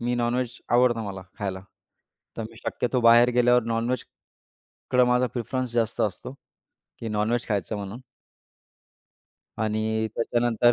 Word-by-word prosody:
मी 120 +1 0
non veg 120 0 -1 0.2
आवडतं 120 -2 +4
मला 95 -2 -6 0.2
खायला. 95 -3 -3 0.8
तर 115 - -3
मी 110 +1 -9
शक्यतो 125 +2 -1
बाहेर 120 +1 +7
गेल्यावर 125 0 +4
नॉनव्हेज 115 +2 -1 0.9
कडं 125 0 +6
माझा 125 +1 +3
प्रिफरन्स 125 +1 -2
जास्त 115 -2 0
असतो, 105 +5 -2 0.7
की 115 - -5
नॉनव्हेज 110 +3 0
खायचं 105 +1 -1
म्हणून. 100 +4 -6 1.6
आणि 110 0 0
त्याच्यानंतर 120 0 +2
115 Hz, 125 wpm, -25 LUFS, 110-125 Hz, 1.6 s, बाहेर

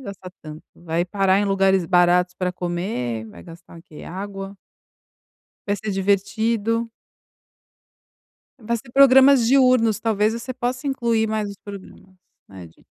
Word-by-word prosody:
gastar 195 -5 -9
tanto. 155 0 -10
Vai 170 0 -2
parar 195 0 +1
em - - 0
lugares 195 -2 +2
baratos 180 +1 +2
para 180 -1 -3
comer. 175 - -4
Vai - - -14
gastar 170 0 -14
o - - -15
quê? 155 -4 -14
Água. 195 +2 -7 1.1
Vai 205 0 0
ser 210 +2 -5
divertido. 220 +4 -1 1.7
Vai 235 0 -2
ser 240 +2 -12
programas 270 -2 +6
diurnos. 250 -4 +3
Talvez 215 -1 +1
você 235 +3 -6
possa 255 +2 -4
incluir 235 -5 0
mais 215 -1 -2
os 200 - -10
programas, 195 -1 -13 0.3
né, 95 -3 -11
de. 80 - -23
200 Hz, 140 wpm, -21 LUFS, 180-230 Hz, 1.7 s, programas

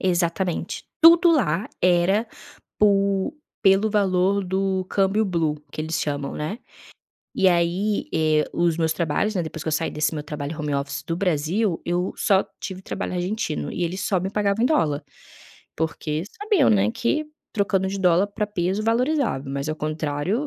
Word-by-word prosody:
Exatamente. 175 0 -1 0.2
Tudo 340 +1 +8
lá 215 - +1
era 180 +5 +3 0.5
por 200 +4 +2 0.3
pelo 195 +1 +4
valor 195 -1 +2
do 190 0 -1
câmbio 195 +2 +2
blue, 165 -6 0 0.2
que - - -5
eles 160 +1 -2
chamam, 145 -2 -3
né. 155 +9 -4 0.8
E 190 - +2
aí, 180 +4 +1
eh, 155 -1 +3
os 170 -2 +1
meus 160 -1 +2
trabalhos, 175 +6 0
né, 180 - 0
depois 160 -1 -6
que - - -4
eu - - -1
saí 160 +2 0
desse 150 +1 -1
meu 150 - -3
trabalho 150 0 -5
home 150 -2 -2
office, 140 +1 -3
do 165 +3 -3
Brasil, 180 +2 0
eu 175 +2 0
só 195 -2 +3 0.2
tive 190 -1 -5
trabalho - - -4
argentino, 180 - -2
e 175 - -2
eles 180 +3 -3
só 190 - +1
me 190 +2 -3
pagavam 205 +1 0
em - - +5
dólar, 155 - +1 0.7
porque 155 -1 -2 0.2
sabiam, 415 - +3
né, 210 0 +3
que 245 +6 -1 0.3
trocando 195 -3 +1
de 195 +1 -3
dólar 180 +1 +4
para 210 +1 -2
peso 195 0 -1
valorizava, 235 - 0
mas 140 +2 -3
ao 155 - -2
contrário 155 - -2
185 Hz, 165 wpm, -23 LUFS, 160-205 Hz, 0.8 s, Tudo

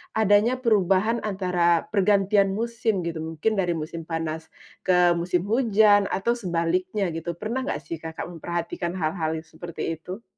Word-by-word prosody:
adanya 215 +3 +4
perubahan 215 -2 +2
antara 180 -4 +1
pergantian 200 -1 +3
musim 225 -4 -1
gitu. 165 -1 -4
Mungkin 165 +7 -1
dari 175 -2 +1
musim 160 +1 -6
panas 160 -1 -3 0.4
ke 180 -1 +5
musim 175 +1 0
hujan 210 -2 +4
atau 200 +5 0
sebaliknya 185 -2 -1
gitu, 165 +1 -4
pernah 220 +8 -3
enggak 150 - -3
sih, 160 +2 -6
Kakak 160 0 -6
memperhatikan 170 +1 -4
hal-hal 160 -2 -1
yang 160 - -6
seperti 165 0 -6
itu? 185 +7 -8
180 Hz, 145 wpm, -25 LUFS, 165-210 Hz, 0.4 s, ke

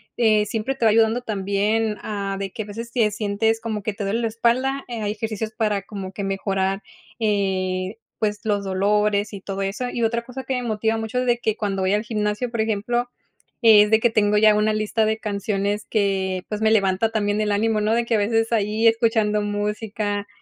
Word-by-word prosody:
eh, 215 -3 +3
siempre 225 +5 -2
te 240 -4 -1
va 220 - +6
ayudando 225 +2 +3
también, 210 0 0
ah, 200 -2 -3
de 195 -1 -4
que 220 - -5
a - - -12
veces, 230 +3 -7
te 230 -4 +3
sientes 215 +1 0
como 220 -3 -4
que 215 0 -2
te 205 - -5
duele 220 +4 0
la 230 - +1
espalda, 255 +5 0
eh, 235 -2 -5
hay 205 -1 -1
ejercicios 215 0 -4
para 215 -3 0
como 195 -1 -7
que 200 - -5
mejorar, 195 0 -1 0.4
eh, 190 -2 -1 0.2
pues, 210 -1 0
los 205 -2 0
dolores 205 +2 +1
y 195 - -7
todo 195 0 -4
eso. 210 +6 -3
Y 240 - -2
otra 235 +1 +1
cosa 260 +2 -7
que 265 - -3
me 250 -1 -1
motiva 220 -1 0
mucho 225 +2 -2
es 255 - 0
de 240 -1 +2
que 220 -2 -1
cuando 195 -3 -2
voy 190 +2 +1
al 210 - +1
gimnasio, 210 +1 -2
por 230 -2 -1
ejemplo, 225 +3 -1 0.5
es 210 -2 +7
de 220 - +6
que 240 - +3
tengo 210 -1 +2
ya 215 0 +6
una 215 0 +2
lista 215 +1 0
de 220 +1 0
canciones 205 0 -2
que, 190 -3 0
pues, 210 0 -3
me 220 - +3
levanta 200 +1 +2
también 205 -1 0
el 210 - 0
ánimo, 215 +1 +1
¿no? 215 +1 +1
De 235 0 +1
que 230 - +1
a - - +3
veces, 225 +2 +1
ahí, 220 0 +2
escuchando 225 -2 +2
música, 205 0 -2
215 Hz, 215 wpm, -22 LUFS, 205-225 Hz, 0.5 s, es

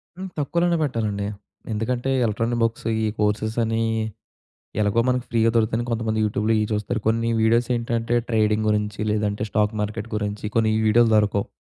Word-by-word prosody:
హ్మ్. 190 +1 -6
తక్కువలోనే 170 +4 +1
పెట్టాలండి. 105 -7 -1 0.4
ఎందుకంటే, 120 +4 -1 0.2
ఎలక్ట్రానిక్ 115 +2 -1
బుక్స్ 115 0 -1
ఇయ్యి 110 -1 0
కోర్సెస్ 105 +1 0
అనీ, 115 0 0 1.0
ఎలాగో 105 +2 +2
మనకి 125 -1 +1
ఫ్రీగా 115 -1 +3
దొరుకుతాయని, 115 +1 +1
కొంతమంది 110 -1 -1
యూట్యూబ్‌లో 105 +1 0
ఇయ్యి 105 -1 0
చూస్తారు. 105 +2 -1
కొన్ని 115 +1 +1
వీడియోసేంటంటే, 115 0 +1
ట్రేడింగ్ 110 -1 +2
గురించి, 105 0 -1
లేదంటే 105 0 -1
స్టాక్ 105 +1 +1
మార్కెట్ 105 +1 -4
గురించి, 105 0 -3
కొన్ని 110 -1 +3
ఈ - - +1
వీడియోలు 115 +1 +5
దొరకవు. 100 -1 +1
110 Hz, 150 wpm, -23 LUFS, 105-115 Hz, 1.0 s, వీడియోలు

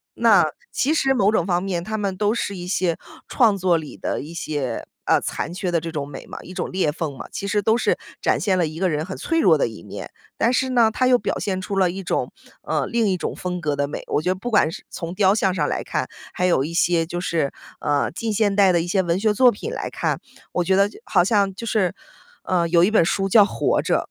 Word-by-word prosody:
那 215 -8 +5 0.3
其 295 +5 +1
实 270 -3 +2
某 205 -4 +3
种 175 -6 +1
方 180 0 +1
面， 180 -3 -2
它 220 +3 -3
们 195 -3 -2
都 210 +1 +1
是 200 -4 -2
一 175 0 -6
些 180 -3 0 0.3
创 220 -6 +3
作 180 -2 +2
里 155 -2 -7
的 - - -2
一 160 +3 -9
些 145 -7 -3 0.2
呃， - - +3
残 170 - -4
缺 180 -1 -3
的 170 - +2
这 165 - -5
种 145 -3 -3
美 140 - -9
嘛， - - -8
一 185 - -10
种 185 - -3
裂 185 -5 +1
缝 150 -4 -4
嘛， - - -8
其 200 - -4
实 205 +1 +1
都 220 +3 +3
是 - - +1 0.2
展 - - +2
现 195 -4 +1
了 170 -3 +2
一 155 +1 -8
个 185 -1 +2
人 155 +1 -1
很 190 - -6
脆 330 0 0
弱 165 - +5
的 140 - +1
一 110 -7 -11
面。 - - -8 0.3
但 235 - +2
是 260 +1 +1
呢， 230 -3 +4
它 255 +4 +1
又 250 -1 +5
表 200 - -2
现 190 -2 -2
出 195 +1 -4
了 185 -2 +4
一 195 +2 -6
种 180 - -1 0.3
呃， - - -1
另 235 -2 +1
一 190 - +2
种 - - -4
风 180 -1 -4
格 150 -2 0
的 140 0 0
美。 145 - -6
我 150 - 0
觉 180 - -1
得 - - 0
不 240 +6 -5
管 205 -7 +4
是 195 - -9
从 170 0 -6
雕 195 -1 +4
像 190 -4 +1
上 150 -4 0
来 - - -1
看， - - -2 0.2
还 180 - 0
有 170 -7 +3
一 165 - -6
些 170 -1 +2
就 175 +1 -4
是， 165 -6 0 0.3
呃， 145 -1 +1
近 220 +4 -3
现 205 -1 +2
代 195 -2 +5
的 170 - +3
一 175 - -4
些 190 +1 +2
文 170 0 0
学 215 0 +2
作 250 +3 +6
品 450 - -6
来 - - -4
看， - - -2 0.3
我 180 - +1
觉 190 - +3
得 200 +1 +4
就 420 - -14
好 175 -4 +3
像 200 -1 +2
就 230 - -7
是， 205 -5 +1 0.5
呃， 175 -2 +1
有 170 0 +5
一 200 - +3
本 210 -7 +4
书 195 +2 0
叫 210 +1 +7
《活 - - 0
着》， - - +1
185 Hz, 285 characters per minute, -22 LUFS, 170-210 Hz, 0.5 s, 叫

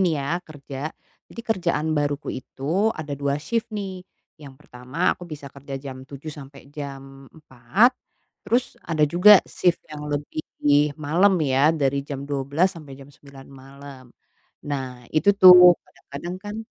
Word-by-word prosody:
nih 175 -4 +2
ya 140 - -4
kerja. 145 -3 -8 0.4
Jadi - - -9
kerjaan 170 -8 -1
baruku 145 -1 -2
itu 155 - -2
ada 155 -2 -6
2 140 0 -1
sif 230 +10 -3
nih. 195 -4 -6 0.4
Yang 140 -3 -12
pertama 125 +8 -2
aku 175 - -11
bisa 145 -3 -9
kerja 140 0 -8
jam 130 -1 -9
7:00 145 +2 -8
sampai 140 -1 -13
jam 135 -2 -9
4:00. 155 - +1 0.5
Terus 240 +4 -1
ada 155 -2 +1
juga 180 +6 +6
sif 175 -1 0 0.2
yang 150 0 -7
lebih 145 +1 -4 0.6
malam 170 +6 +2
ya, 135 +2 +3
dari 140 -3 0
jam 140 -1 -6
12:00 145 +6 0
sampai 145 -4 -11
jam 140 +1 -15
9:00 140 -1 -15
malam. 135 0 -13 0.6
Nah 130 -4 -5
itu 200 +6 +4
tuh 180 -2 +9
kadang-kadang 170 +6 -9
kan, 205 0 -6
145 Hz, 145 wpm, -23 LUFS, 135-175 Hz, 0.6 s, tuh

